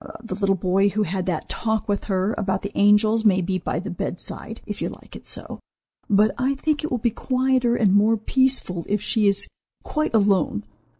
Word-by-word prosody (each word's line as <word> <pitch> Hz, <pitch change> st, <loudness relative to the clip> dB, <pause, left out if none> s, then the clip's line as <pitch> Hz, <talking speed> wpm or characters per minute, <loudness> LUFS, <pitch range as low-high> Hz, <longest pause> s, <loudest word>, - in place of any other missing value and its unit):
The 225 Hz, -, -5 dB
little 195 Hz, -2 st, +1 dB
boy 190 Hz, +2 st, +2 dB
who 210 Hz, +2 st, 0 dB
had 185 Hz, 0 st, -3 dB
that 170 Hz, -4 st, -2 dB
talk 220 Hz, -2 st, -2 dB
with 205 Hz, -1 st, -1 dB
her 195 Hz, +1 st, 0 dB
about 190 Hz, -2 st, -2 dB
the 200 Hz, +1 st, -6 dB
angels 210 Hz, +2 st, +4 dB
may 195 Hz, -4 st, +4 dB
be 185 Hz, +1 st, -1 dB
by 160 Hz, -, -3 dB
the 190 Hz, +3 st, -4 dB
bedside, 180 Hz, +5 st, -3 dB
if 210 Hz, -2 st, -6 dB
you -, -, -1 dB
like -, -, -13 dB
it -, -, -10 dB
so; -, -, -3 dB, 0.5 s
but 210 Hz, +1 st, +4 dB
I 265 Hz, +2 st, +1 dB
think 300 Hz, +2 st, -1 dB
it 310 Hz, -, -2 dB
will 250 Hz, -, -1 dB
be 235 Hz, 0 st, 0 dB
quieter 255 Hz, 0 st, +1 dB
and 205 Hz, -5 st, +3 dB
more 215 Hz, +3 st, +4 dB
peaceful 240 Hz, -7 st, +2 dB
if 205 Hz, +1 st, +1 dB
she 210 Hz, +1 st, +1 dB
is 200 Hz, 0 st, +2 dB, 0.4 s
quite 305 Hz, -6 st, -2 dB
alone. 200 Hz, -, +2 dB
210 Hz, 200 wpm, -23 LUFS, 195-230 Hz, 0.5 s, angels